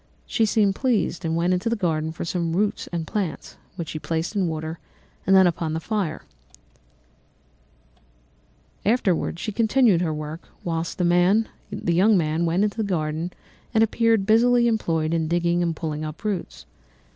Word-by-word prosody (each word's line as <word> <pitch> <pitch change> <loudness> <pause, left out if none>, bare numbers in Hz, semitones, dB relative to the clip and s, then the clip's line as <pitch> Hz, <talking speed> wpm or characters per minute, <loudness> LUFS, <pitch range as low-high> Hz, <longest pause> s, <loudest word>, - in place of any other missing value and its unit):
She 225 - +1
seemed 205 -2 +3
pleased 205 -6 0
and 165 -1 -1
went 175 +2 +2
into 185 +5 0
the 230 - +1
garden 160 -6 -1
for 160 - -6
some 170 -1 -1
roots 205 +2 0
and 170 -2 -4
plants, 185 -4 -4 0.2
which 170 -4 -5
she 155 - -4
placed 165 +5 -3
in 190 -3 +1
water, 160 0 -4 0.5
and 195 - +6
then 190 -1 +7
upon 165 -2 0
the - - -1
fire. 190 -3 -2 2.6
She - - +1
afterwards 195 -5 0
continued 225 -5 +3
her 170 -3 0
work, 155 +2 -5 0.2
whilst 165 -1 -3
the 180 +5 +3 0.4
young 190 +5 +4
man 160 0 0
went 175 +4 +2
into 210 +1 -1
the 220 - 0
garden 165 -3 -2 0.4
and 220 - +6
appeared 225 -2 +2
busily 235 +3 +4
employed 165 -8 0
in 160 -1 0
digging 175 +1 +1
and 170 -2 0
pulling 155 -1 -4
up 155 +5 -7
roots. 205 -5 -4
175 Hz, 160 wpm, -24 LUFS, 165-210 Hz, 2.6 s, then